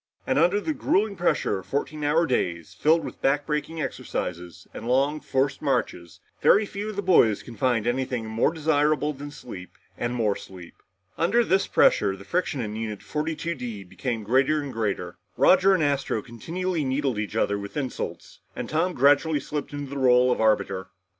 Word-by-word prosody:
And - - +1
under 180 +5 +3
the 310 +9 -2
grueling 210 -6 +1
pressure 170 - 0
of 95 - -13
fourteen 150 +2 -3
hour 155 +3 +3
days, 85 - -2
filled 160 +2 +2
with - - -9
backbreaking 150 +3 0
exercises 90 -1 -5
and - - -7
long 140 +4 +2
forced 135 -1 -1
marches, 120 - -2 0.2
very 210 - +5
few 205 +1 -5
of 215 - -6
the 200 - -2
boys 120 - +4
can 120 - -10
find 120 -4 +1
anything 125 -1 -1
more 110 +6 +1
desirable 150 -1 +1
than 145 +1 -8
sleep 120 - -10 0.2
and 120 +1 -2
more 110 -4 +1
sleep. 90 -3 -11 0.5
Under 200 +9 +3
this 190 -3 +2
pressure 95 -1 +3
the 100 0 -13
friction 170 -6 -1
in 105 -2 -4
Unit 110 -2 -5
42 160 +2 -3
D 120 -8 -6
became 115 +4 -4
greater 130 +7 +2
and 145 -2 -5
greater. 100 -5 -3 0.2
Roger 190 +1 +5
and 165 - +1
Astro 140 -7 0
continually 165 +8 -3
needled 130 -3 -1
each 105 - -4
other 100 0 +1
with 100 +7 -7
insults, 135 -3 -5 0.2
and - - -4
Tom 170 +4 0
gradually 145 +3 +3
slipped 145 +1 -5
into 145 -1 -6
the 140 - -4
role 125 -1 +5
of 125 - 0
arbiter. 100 -3 +1
135 Hz, 180 wpm, -25 LUFS, 110-155 Hz, 0.5 s, very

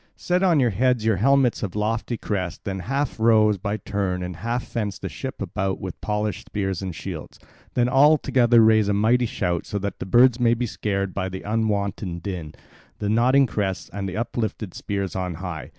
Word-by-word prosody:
Set 180 +1 0
on 175 -5 +4
your 125 -3 +3
heads 125 +2 +1
your 110 -3 +3
helmets 135 +3 +3
of 100 -3 -4
lofty 110 +2 -1
crest, 95 -6 -3
then 95 -1 -3
half 135 +6 -2
row 110 -2 +5
by 100 +2 -3
turns, 95 -3 -2
and 90 -2 -6
half 120 +5 -2
fence 105 -5 -3
the - - -5
ship 135 -1 -6
about 95 0 -2
with 95 -2 -7
polished 105 -2 -2
spears 95 -3 -2
and 95 -3 -5
shields. - - -7 0.4
Then 120 -1 +3
all 145 +5 +6
together 120 -4 +4
raise 110 -2 +5
a 100 - +1
mighty 115 +4 +3
shout 85 -5 -2
so 105 - -3
that 100 0 -4
the - - -5
birds 120 +4 +5
may 120 -1 +4
be 125 +1 -1
scared 100 -4 -2
by 95 -1 -2
the 95 0 -7
unwonted 100 -5 -1
din, 85 -6 -5 0.4
the 105 - -2
nodding 125 +5 +4
crests, 100 -5 -3
and 100 -1 -3
the 95 - -5
uplifted 110 -4 -3
spears 100 -2 -3
on 90 -2 -2
high. 90 -2 -6
105 Hz, 200 wpm, -23 LUFS, 95-120 Hz, 0.4 s, all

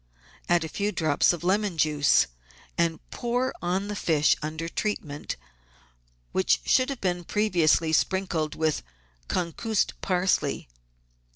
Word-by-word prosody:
Add 175 -1 +4
a - - -3
few 205 +6 -2
drops 155 -7 +3
of 175 -1 -5
lemon 195 0 +1
juice, 150 -2 +4 0.5
and 170 -1 +1
pour 245 +2 -1
on 185 +3 -1
the 210 - -4
fish 155 -5 +3
under 155 +2 -4
treatment, 160 -6 -3 1.0
which - - +2
should 255 +1 +3
have 275 -3 -5
been 180 -2 -1
previously 170 -5 +2
sprinkled 175 -3 0
with 155 -1 0 0.5
concussed 190 +5 -1
parsley. 185 0 0
175 Hz, 120 wpm, -26 LUFS, 160-200 Hz, 1.0 s, Add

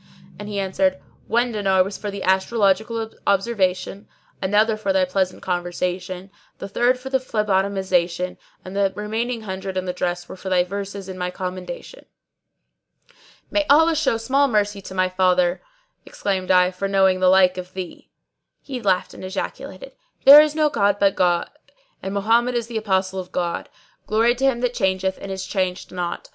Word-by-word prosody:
and 205 0 -7
he 205 - -4
answered, 190 -1 +1 0.3
'One 240 +1 +1
dinar 195 -3 +2
was 195 +1 -6
for 210 - -5
the 200 -1 -6
astrological 220 +3 +1 0.2
observation, 195 -1 0 0.3
another 210 +3 +2
for 215 -2 -2
thy 190 -1 +3
pleasant 185 0 -2
conversation, 180 +1 -3 0.3
the 195 - -6
third 240 +5 +2
for 265 +1 -8
the 265 - +2
phlebotomisation, 190 -6 0 0.3
and 185 +1 -8
the 200 -1 +2
remaining 225 +3 -3
hundred 190 -2 -5
and 185 0 -2
the 180 - -1
dress 175 -1 -3
were - - -8
for 190 +1 -7
thy 180 -1 +3
verses 200 +1 -6
in 185 -1 -7
my 180 0 -1
commendation.'" 185 - -7 1.4
"May 305 - +2
Allah 320 +3 +5
show 305 -7 +1
small 270 +5 +2
mercy 205 -4 0
to 190 - -9
my 185 0 +2
father," 185 -1 +2 0.4
exclaimed 190 -2 -3
I, 180 -1 +5
"for 185 +2 -3
knowing 190 -1 +3
the 185 0 +4
like 185 -1 +4
of 185 +1 -9
thee." 185 -2 -7 0.5
He 260 -3 -7
laughed 190 -4 0
and - - -11
ejaculated, 190 - -6 0.3
"There 285 +2 +11
is 305 0 0
no 305 -1 +2
god 205 -4 +2
but 200 -1 +4
the - - -20
God 175 -2 +2 0.5
and 190 - -4
Mohammed 230 +5 +2
is 235 -1 0
the 230 -1 -5
Apostle 190 -2 0
of 180 -1 -8
God! 175 -1 -3 0.4
Glory 225 +3 +3
to 260 +2 -1
Him 250 -3 +1
that 250 -1 0
changeth 190 -3 0
and 195 - -6
is 190 0 -4
changed 185 -2 -2
not! 175 -1 -4
195 Hz, 175 wpm, -22 LUFS, 185-220 Hz, 1.4 s, There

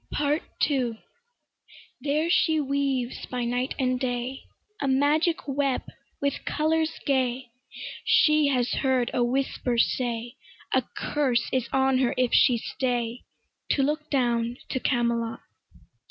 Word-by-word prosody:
PART 295 +2 +1 0.3
II 245 -6 -1 1.0
There 300 +3 0
she 320 -3 +3
weaves 275 -3 -1
by 250 -1 -3
night 245 +2 -1
and 255 -1 0
day 250 0 -3 0.4
A 280 - 0
magic 295 +5 +2
web 275 -1 0 0.4
with 280 -1 -1
colours 315 +1 0
gay. 255 -3 0 0.5
She 310 -11 +4
has 255 -3 +1
heard 260 -2 +1
a 245 - +2
whisper 250 -1 -1
say, 240 0 0 0.4
A - - +4 0.2
curse 270 -5 0
is 260 -2 0
on 265 -1 +3
her 255 -2 +1
if 255 -1 +1
she 245 - +5
stay 240 0 -2 0.5
To 275 - +2
look 300 +2 -1
down 240 -3 +1
to 260 - -1
Camelot. 235 -3 0
260 Hz, 125 wpm, -26 LUFS, 245-285 Hz, 1.0 s, she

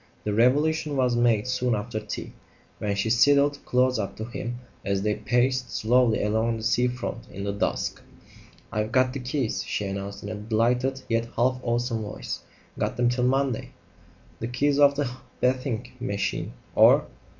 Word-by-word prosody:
The 105 - -1
revelation 145 +6 +2
was 125 -2 +2
made 120 -3 +3
soon 125 -2 +1
after 110 +1 -3
tea, 105 -1 -6 0.5
when 100 -1 -1
she 100 +3 0
sidled 140 +4 +4
close 125 -1 +2
up 100 - -3
to 110 - -5
him 120 +1 -5 0.3
as 100 0 0
they 105 0 +2
paced 125 +2 +1
slowly 120 0 +2
along 110 +2 +1
the 110 - -7
sea 120 +2 +3
front 125 -1 -5
in 100 - -6
the 100 - -1
dusk. 100 - -2 0.7
"I've 105 +1 -1
got 130 0 +3
the 140 - -3
keys," 125 -2 -2
she 105 - -2
announced 100 +1 -5
in 100 - -5
a - - -3
delighted, 120 +5 0
yet 115 0 +1
half 125 +2 +2
awesome 120 -1 -1
voice. 105 - -5 0.4
"Got - - -1
them 120 0 +3
till 125 0 +1
Monday!" 135 -2 0 0.7
"The 115 - -3
keys 140 +4 +1
of 140 -1 +6
the 145 -1 0 0.3
bathing 125 -2 0
machine, 100 -5 -2 0.2
or - - +6
120 Hz, 170 wpm, -26 LUFS, 110-130 Hz, 0.7 s, of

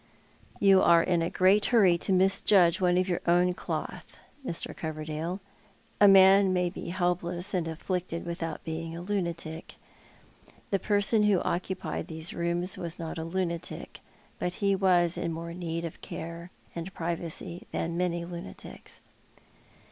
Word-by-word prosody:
" - - -27
You 195 -1 +6
are 170 -1 +6
in 175 -2 +1
a 165 - 0
great 195 +3 +4
hurry 200 -8 +5
to 195 - -2
misjudge 190 -1 +4
one 180 -1 +3
of 185 +1 +2
your 175 -2 -1
own 175 +1 +4
cloth, - - -6 0.3
IMr. 170 -10 -4
Coverdale. 155 +3 -4 0.6
A 205 - +8
man 195 0 +7
may 180 -1 +1
be - - -7
helpless 175 +1 -2
and 175 -3 0
afflicted 170 +1 -3
without 170 -1 -4
being 165 0 -5
a - - -6
lunatic. 170 -4 -4 1.0
The 195 - +2
person 205 +2 +2
who 200 -3 +4
occupied 185 +1 -3
these 160 +1 -3
rooms 175 +2 -2
•was 170 0 -5
not 165 -1 -5
a - - -3
lunatic; 170 0 -4 0.4
but 180 - -2
he 200 +1 +1
was 180 -3 +3
in 170 - -2
more 165 +1 -5
need 170 -1 -4
of 165 - -8
care 170 +2 -7 0.2
and 170 +2 -6
privacy 170 0 -5
than 165 0 -2
many 175 -1 -1
lunatics." 170 - -9
175 Hz, 150 wpm, -28 LUFS, 170-185 Hz, 1.0 s, A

